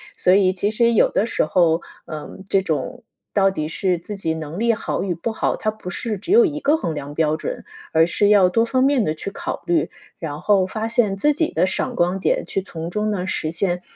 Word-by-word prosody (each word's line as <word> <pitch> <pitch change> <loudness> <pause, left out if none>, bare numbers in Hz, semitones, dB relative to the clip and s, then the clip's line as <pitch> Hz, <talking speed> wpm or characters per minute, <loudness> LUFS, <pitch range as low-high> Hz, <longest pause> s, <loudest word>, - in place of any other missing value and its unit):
所 185 +1 +4
以 190 -2 +4
其 195 +2 0
实 235 +2 +2
有 230 - +4
的 210 - +1
时 230 - 0
候， 165 0 +2 0.2
嗯， 155 +4 -8
这 195 - +3
种 165 - -3 0.3
到 195 -1 +4
底 155 -5 -3
是 180 +1 0
自 205 +5 -7
己 165 -5 -1
能 160 +3 -6
力 235 0 +3
好 220 - -3
与 185 -3 -2
不 170 +8 -3
好， 220 - -1
它 215 - -1
不 215 -4 -9
是 210 +4 -3
只 215 - -2
有 465 +1 +7
一 300 -4 -2
个 295 +2 +3
衡 180 - -2
量 145 -1 -6
标 155 -1 +1
准， - - -5 0.3
而 160 0 +5
是 200 +4 +2
要 200 -3 +5
多 230 +4 +2
方 255 +2 +1
面 270 -5 +3
地 155 - -1
去 195 - -6
考 - - -5
虑。 170 -1 +1 0.3
然 150 -2 -5
后 195 -3 +3
发 220 +3 -3
现 225 -4 +2
自 295 +10 +2
己 315 +2 0
的 - - +3
闪 190 - -1
光 180 +2 +1
点 - - 0
去 195 - -2
从 165 -3 -7
中 210 +2 -1
呢 185 -3 -2
实 160 -4 -2
现， 180 +1 -1
195 Hz, 255 characters per minute, -21 LUFS, 165-220 Hz, 0.3 s, 有